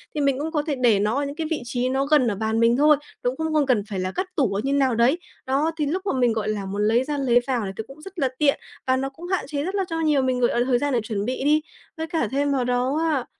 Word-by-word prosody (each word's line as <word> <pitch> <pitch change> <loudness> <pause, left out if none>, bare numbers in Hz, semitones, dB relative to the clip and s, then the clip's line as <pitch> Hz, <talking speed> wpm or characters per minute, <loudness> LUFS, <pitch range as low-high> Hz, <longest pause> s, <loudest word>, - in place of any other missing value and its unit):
Thì 300 - 0
mình 275 -2 +1
cũng 315 +2 -3
có 300 -3 +1
thể 295 - 0
để 240 -6 +3
nó 210 +3 +1
ở 285 +1 0
những 280 +1 -5
cái 320 0 -3
vị - - +2
trí 245 +1 -1
nó 270 +1 0
gần 285 -3 +4
ở 210 - 0
bàn 220 +2 -1
mình 230 +1 +4
thôi, 300 +1 +5 0.3
nó 245 - +2
cũng 255 - -6
không 320 0 -2
không 300 -2 +3
cần 245 -6 +2
phải 195 -3 -3
là 185 0 -2
cất 370 - -2
tủ 255 -10 +1
ở 200 - -1
như 275 +1 0
nào 265 -4 +2
đấy, 245 +9 +3 0.3
đó, 280 +5 +1
thì 300 - 0
lúc 370 +7 -2
mà 390 - 0
mình, 245 -2 +3
gọi 215 -1 -2
là, 205 -2 -2
muốn 200 +2 -2
lấy 235 +3 +3
ra 290 +2 -3
lấy 250 -3 +3
vào 265 - +1 0.2
thì 220 - -3
cũng 275 +3 -13
rất 385 +2 -9
là 270 - +2
tiện 290 -2 +3 0.3
và 260 - +3
nó 270 +1 -2
cũng 320 +6 -10
hạn 375 0 -1
chế 285 -1 -2
rất 375 +5 -3
là 390 -1 0
cho 325 0 -2
nhiều 300 -4 +2
mình, 255 -1 0
gọi 240 -1 +2
là, 240 - +2
thời 255 -1 +2
gian 285 0 -1
để 240 - +3
chuẩn 205 -2 -3
bị 255 +3 -3
đi. 305 +1 +4 0.4
Với 320 0 -3
cả 325 -8 -1
thêm 285 +1 +1
vào 265 -2 +1
đó 250 +3 0
á, 265 -5 0
270 Hz, 325 wpm, -23 LUFS, 240-300 Hz, 0.4 s, thôi